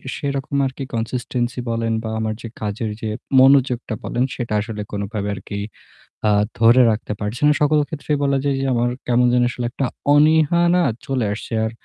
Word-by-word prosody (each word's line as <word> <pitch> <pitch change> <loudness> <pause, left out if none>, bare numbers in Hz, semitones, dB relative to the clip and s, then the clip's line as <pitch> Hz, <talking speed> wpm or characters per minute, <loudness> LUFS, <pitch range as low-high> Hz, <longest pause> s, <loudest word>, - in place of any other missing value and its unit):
সেরকম 140 0 -3
আর 130 - -2
কি 140 - -4
consistency 120 +1 -2
বলেন 115 0 -1
বা 110 - -4
আমার 110 0 -1
যে - - -6
কাজের 110 +1 -3
যে 110 - -2 0.3
মনোযোগটা 130 -3 +4
বলেন 125 - -1
সেটা 120 -3 -4
আসলে 105 -1 -5
কোনভাবে 100 0 -3
আর - - -7
কি 100 - -4 0.7
আ - - +4 0.3
ধরে 115 +3 +6
রাখতে 105 -1 -3
পারছি 105 +5 -4
না। 150 - +6
সকল 150 +1 +4
ক্ষেত্রেই 150 -1 -2
বলা 140 -1 +2
যায় 140 -1 +1
যে 135 - -1
আমার 120 0 +1 0.2
কেমন 125 0 +3
যেন 125 0 +3
আসলে 120 0 -4
একটা 135 - -2 0.3
অনীহা 155 +2 +4
না 180 - +3 0.2
চলে 130 -4 -1
আসছে 110 +2 -7
আর 110 - -2
120 Hz, 185 wpm, -20 LUFS, 110-140 Hz, 0.7 s, ধরে